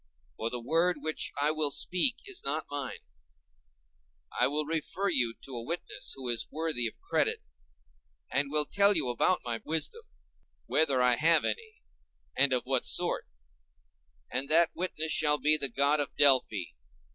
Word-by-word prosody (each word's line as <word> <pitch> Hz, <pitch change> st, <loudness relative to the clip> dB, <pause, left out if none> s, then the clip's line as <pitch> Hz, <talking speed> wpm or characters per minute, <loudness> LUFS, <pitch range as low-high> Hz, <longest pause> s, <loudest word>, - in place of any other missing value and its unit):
For 115 Hz, -, -2 dB
the 125 Hz, -, -5 dB
word 165 Hz, +8 st, +1 dB
which 155 Hz, 0 st, -1 dB
I 145 Hz, +2 st, +2 dB
will 155 Hz, -1 st, +1 dB
speak 185 Hz, -, +2 dB
is 395 Hz, -3 st, -4 dB
not 150 Hz, +3 st, -2 dB
mine. 140 Hz, -3 st, -5 dB, 1.3 s
I 125 Hz, -, +1 dB
will 150 Hz, +2 st, -2 dB
refer 165 Hz, +5 st, -2 dB
you 115 Hz, -2 st, +1 dB
to 135 Hz, -, -9 dB
a 120 Hz, -, -4 dB
witness 170 Hz, +8 st, -4 dB
who 130 Hz, -2 st, -7 dB
is 120 Hz, -2 st, 0 dB
worthy 155 Hz, -6 st, -1 dB
of 110 Hz, -, -10 dB
credit, -, -, -1 dB, 0.9 s
and 140 Hz, +1 st, 0 dB
will 150 Hz, 0 st, +2 dB
tell 200 Hz, +5 st, +3 dB
you 140 Hz, -6 st, 0 dB
about 180 Hz, +10 st, +1 dB
my 115 Hz, -2 st, -4 dB
wisdom—whether 160 Hz, -, -2 dB
I 125 Hz, -1 st, +4 dB
have 160 Hz, +1 st, +4 dB
any, 450 Hz, -1 st, -5 dB, 0.5 s
and 140 Hz, -1 st, +3 dB
of 125 Hz, -1 st, +1 dB
what 130 Hz, -1 st, +1 dB
sort—and -, -, -4 dB
that 165 Hz, +2 st, +4 dB
witness 160 Hz, -3 st, -2 dB
shall 150 Hz, -1 st, +3 dB
be 150 Hz, +1 st, +4 dB
the 140 Hz, -3 st, +3 dB
god 140 Hz, +4 st, +2 dB
of 145 Hz, -, -3 dB
Delphi. 130 Hz, -9 st, +4 dB
145 Hz, 155 wpm, -29 LUFS, 125-160 Hz, 1.3 s, I